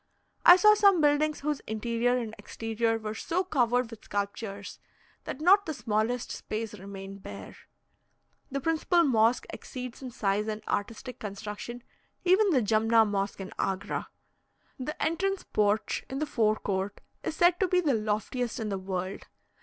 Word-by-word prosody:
I 350 - +10
saw 425 +3 +7
some 400 -4 +5
buildings 300 0 +2
whose 295 0 -1
interior 235 +3 0
and 225 -3 -4
exterior 225 0 -1
were 215 -1 -5
so 335 +11 -1
covered 245 -7 +1
with 230 - -11
sculptures, 200 0 -4 0.5
that - - -5
not 385 +5 +5
the 315 - -3
smallest 225 +1 -1
space 215 0 -4
remained 195 0 -9
bare. - - -9 0.9
The 275 0 -3
principal 325 +3 +2
mosque 235 -4 +3
exceeds 255 -1 -7
in 260 - -5
size 210 -2 0
and 215 0 -4
artistic 230 +4 -3
construction 210 +4 -6 0.4
even 385 +3 +5
the 265 -9 +3
Jumna 225 +1 +4
Mosque 200 -1 -2
in 190 - -7
Agra. 195 +1 -2 0.7
The 300 +4 -5
entrance 375 +5 0
porch 210 +1 0
in 265 - -4
the 305 - 0
fore 220 -6 +2
court 200 -1 -3 0.2
is - - -3
said 350 +1 +4
to 380 - +3
be 360 0 +3
the 310 -6 +2
loftiest 220 +3 -1
in 220 -2 -2
the 195 -1 -2
world. 185 0 -4
230 Hz, 155 wpm, -29 LUFS, 210-300 Hz, 0.9 s, I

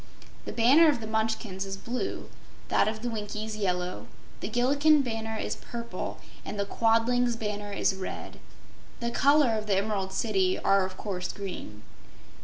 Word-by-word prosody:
The - - -4
banner 275 +8 +6
of 285 - +1
the 220 - -6
Munchkins 220 -3 -1
is 195 0 -5
blue, 250 - -4 0.4
that - - +3
of 220 +1 -3
the - - -1
Winkies 215 0 -4
yellow; 180 -3 -2 0.3
the - - -4
Gillikin 280 +5 +4
banner 225 -2 -3
is - - -3
purple, 235 0 -6 0.3
and 210 - -5
the 200 - +1
Quadling's 230 +3 +2
banner 210 -2 -4
is 200 - +1
red. 190 -1 -6 0.6
The 235 -1 -2
colors 275 -4 +4
of 215 - -7
the 195 -2 +3
Emerald 195 -2 -1
City 190 -2 +1
are 195 -1 +3
of 185 0 -11
course 185 -4 -3
green. 175 - -7
220 Hz, 160 wpm, -28 LUFS, 195-235 Hz, 0.6 s, banner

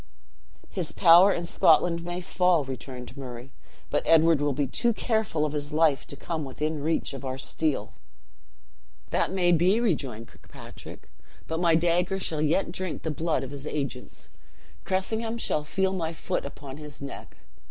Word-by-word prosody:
"His 175 -5 -3
power 180 +2 +7
in 175 -2 -2
Scotland 170 0 +3
may 175 +1 -4
fall," 180 -3 +2
returned 130 -1 -7
Murray; 125 -2 -8 0.4
"but - - +2
Edward 165 -2 +5
will 145 0 +2
be 140 +1 0
too 235 - +1
careful 220 -10 0
of 150 - -3
his 145 0 -3
life 150 -3 +2
to - - -8
come 160 +2 -4
within 150 +3 -3
reach 160 -1 -1
of 135 - -7
our 130 -1 -3
steel." 135 -4 -1 1.2
"That - - +1
may 180 -2 +2
be," 180 +6 +4
rejoined 135 - -1
Kirkpatrick; - - -13 0.4
"but 160 0 -3
my 170 -2 +4
dagger 175 +3 +2
shall 160 -5 -2
yet 160 +4 +1
drink 185 -1 -5
the 160 - -1
blood 160 -2 -1
of 135 - -7
his 140 +1 -7
agents. 135 -4 -5 0.6
Cressingham 220 +5 -1
shall 155 -9 -1
feel 190 +5 0
my 165 -3 -2
foot 165 -2 -3
upon 140 -1 -10
his 150 -4 -10
neck! 140 0 -9
160 Hz, 165 wpm, -27 LUFS, 140-180 Hz, 1.2 s, power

